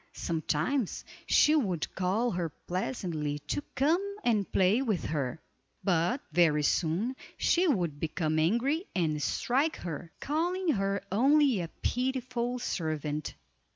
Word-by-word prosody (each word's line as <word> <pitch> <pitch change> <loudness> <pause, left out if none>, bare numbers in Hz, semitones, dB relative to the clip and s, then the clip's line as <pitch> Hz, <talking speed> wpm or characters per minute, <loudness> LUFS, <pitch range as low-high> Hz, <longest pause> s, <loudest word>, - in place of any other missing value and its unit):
Sometimes 165 - -1 0.2
she 305 - +5
would 190 - 0
call 200 +6 0
her 175 -2 -2 0.2
pleasantly 175 - -2
to 220 - -1
come 350 +9 +1
and 215 -5 +1
play 190 +7 +3
with 215 -10 -1
her, 145 -2 -2 0.4
but 185 - +1
very 155 -2 +4
soon 180 - +1 0.2
she 360 +2 +3
would 175 - 0
become 155 0 -1
angry 255 - +1
and 155 -5 0
strike 275 - +1
her, 170 0 -6
calling 350 +5 -1
her 195 -6 0
"only 270 0 +4
a 170 - -3 0.2
pitiful 250 -1 -1
servant." 155 - -3
195 Hz, 120 wpm, -30 LUFS, 160-265 Hz, 0.4 s, she